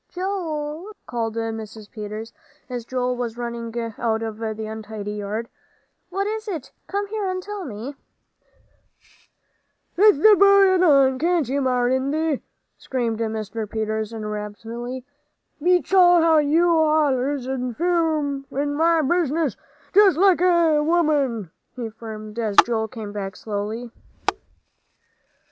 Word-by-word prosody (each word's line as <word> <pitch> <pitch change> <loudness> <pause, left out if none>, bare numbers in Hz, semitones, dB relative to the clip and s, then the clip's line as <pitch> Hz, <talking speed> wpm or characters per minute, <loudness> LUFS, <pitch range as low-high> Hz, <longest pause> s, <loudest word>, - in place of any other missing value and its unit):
"Joel," 355 -1 -4
called 230 -2 -3
Mrs. 220 -2 -5
Peters, 215 +1 -7 0.3
as 245 -3 -5
Joel 250 0 -1
was 240 -2 -4
running 235 -1 -4 0.3
out 225 -1 0
of 220 -1 -5
the 220 -1 -4
untidy 215 -1 -6
yard, 210 +2 -4 0.6
"what 390 +2 -1
is 435 +1 -3
it? 325 -10 -5 0.2
Come 405 +1 -2
here 420 -2 -2
and 370 0 -2
tell 415 -2 -6
me." 245 +3 -6 2.0
"Let 420 0 +7
th' 415 +8 +6
boy 395 -1 +6
alone, 275 -7 +4
can't 340 -3 +1
ye, 275 +3 0
Marindy?" 260 +4 +1 0.4
screamed 235 -4 -2
Mr. 220 -1 -3
Peters, 220 0 -2
irritably; 225 +3 -6 0.6
"beats 360 +3 +2
all 355 -2 +7
how 325 -1 +5
you 330 +4 +3
allers 290 -4 +2
interfere 285 +3 0 0.2
in 290 0 0
my 325 +1 +3
business 320 -1 +1 0.4
just 390 -4 +6
like 375 -1 +4
a 340 -4 +4
woman!" 295 - +1 0.2
he 235 -3 -5
fumed, 215 0 -8
as 215 -3 -1
Joel 225 -2 -1
came 215 -2 -7
back 195 -1 -5
slowly. 215 +3 -4
260 Hz, 120 wpm, -23 LUFS, 225-335 Hz, 2.0 s, Let